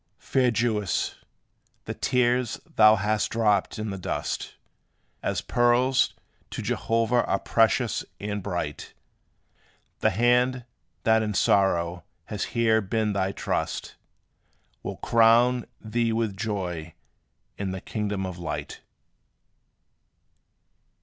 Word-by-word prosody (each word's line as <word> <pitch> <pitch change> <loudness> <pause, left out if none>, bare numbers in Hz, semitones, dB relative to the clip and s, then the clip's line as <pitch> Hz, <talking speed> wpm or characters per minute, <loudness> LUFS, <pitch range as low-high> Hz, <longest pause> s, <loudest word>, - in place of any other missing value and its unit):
Fair 130 -2 +1
Jewess, 115 -5 0 0.7
the - - -4
tears 125 -1 +1
thou 110 0 +6
hast 105 +1 0
dropped 105 -3 +1
in 110 -1 -3
the 95 - -5
dust, - - -3 0.7
As - - -1
pearls, 125 +2 +2 0.3
to - - -5
Jehovah 115 +1 +1
are - - +1
precious - - +1 0.2
and 105 0 -3
bright. 85 -6 -4 1.0
The - - +3
hand, 125 +3 +2 0.4
that 110 0 +4
in 105 -2 -2
sorrow 90 -4 +2 0.2
has 105 +1 -3
here 110 -1 +4
been 105 +1 -1
thy 95 -1 0
trust, - - -3 0.9
Will - - -5
crown 115 +2 +4
thee 115 +1 -1
with 110 -3 -1
joy 90 -7 -4 0.6
in 100 -1 -2
the 95 0 -4
kingdom 105 -1 -3
of 90 -1 -6
light. 85 - -5
110 Hz, 110 wpm, -26 LUFS, 95-120 Hz, 1.0 s, thou